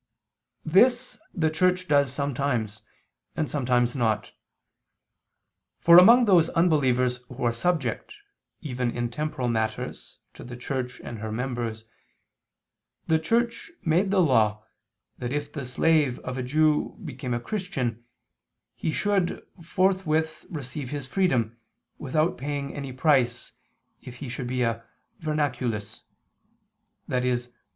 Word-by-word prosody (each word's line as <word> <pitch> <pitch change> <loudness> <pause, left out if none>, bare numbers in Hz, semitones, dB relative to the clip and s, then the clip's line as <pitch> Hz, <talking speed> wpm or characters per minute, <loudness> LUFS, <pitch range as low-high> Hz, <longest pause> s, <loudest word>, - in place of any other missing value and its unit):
This 240 +7 +3
the 160 -4 0
Church 180 +3 +1
does 140 -4 +3
sometimes, 130 -6 -2 0.5
and 155 - -1
sometimes 125 -3 +1
not. 110 -4 0 1.5
For 170 +1 +9
among 235 +6 +7
those 175 -5 +5
unbelievers 130 -7 +2
who 125 +1 -7
are 120 -1 +2
subject, 135 -2 -1 0.5
even 125 -5 -2
in 120 0 -3
temporal 135 -1 -2
matters, 110 -2 -3 0.2
to - - -11
the 120 0 -8
Church 125 0 -4
and 115 - -7
her 110 0 -5
members, 120 -2 -3 1.2
the 160 0 +2
Church 235 - 0 0.2
made 175 +5 +2
the 195 -1 +3
law 110 -7 +2 0.6
that 120 0 -3
if 145 0 -3
the 140 -5 -5
slave 145 0 +2
of 125 - -5
a 130 - -2
Jew 150 +4 +1
became 130 -4 -4
a - - -1
Christian, 125 - -3 0.7
he - - -3
should 195 +1 0 0.2
forthwith 165 -3 0
receive 140 -3 -6
his 145 -1 -4
freedom, 125 - 0 0.4
without 155 +3 0
paying 140 +1 -3
any 140 -2 -5
price, 130 -3 +1 0.5
if 125 - -10
he 130 +1 -7
should 125 +1 -4
be 125 0 0
a 115 -1 -1 0.4
"vernaculus," 130 -9 -2 1.0
i.e. 125 0 +1
135 Hz, 125 wpm, -26 LUFS, 120-160 Hz, 1.5 s, For